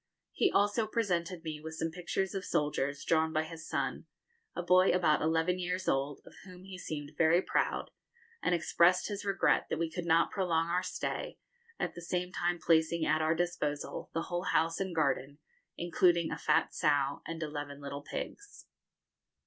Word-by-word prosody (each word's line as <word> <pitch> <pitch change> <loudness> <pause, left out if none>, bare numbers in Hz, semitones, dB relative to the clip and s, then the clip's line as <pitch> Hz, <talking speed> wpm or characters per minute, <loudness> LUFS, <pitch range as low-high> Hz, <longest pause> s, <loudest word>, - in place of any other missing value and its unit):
He 395 - +2
also 205 +2 +2
presented 180 -6 -1
me 155 -2 -5
with 160 +1 -7
some 165 0 -2
pictures 180 +2 -2
of 195 -1 -3
soldiers, 145 -3 -1
drawn 160 -1 +2
by 155 0 +1
his 160 0 -9
son - - -2 0.5
a 175 - -3
boy 185 +1 +5
about 170 -4 +3
eleven 165 +3 +1
years 180 +1 -2
old, 140 +1 0
of - - -14
whom 180 0 -12
he 190 0 -9
seemed 145 -4 -5
very 160 +2 +4
proud, - - -1 0.5
and 175 - +2
expressed 175 +2 +3
his 205 -1 -4
regret 195 -2 +2
that - - -1
we 165 -1 -1
could 175 +1 -4
not 165 0 +4
prolong 170 -4 0
our 180 +1 +1
stay, 185 - -4 0.4
at - - -2
the 175 - -9
same 180 +1 -2
time 175 -1 0
placing 160 0 +2
at 155 +1 +2
our 160 +1 +2
disposal 160 -4 -2
the 165 - -2
whole 175 0 -3
house 165 0 +1
and 190 -3 -3
garden, 140 -2 0 0.4
including 170 -1 +2
a - - -3
fat 155 +1 +2
sow 145 -3 +1
and 165 0 -4
eleven 145 -2 -5
little 140 0 -6
pigs. 410 - -7
165 Hz, 175 wpm, -32 LUFS, 155-180 Hz, 0.5 s, boy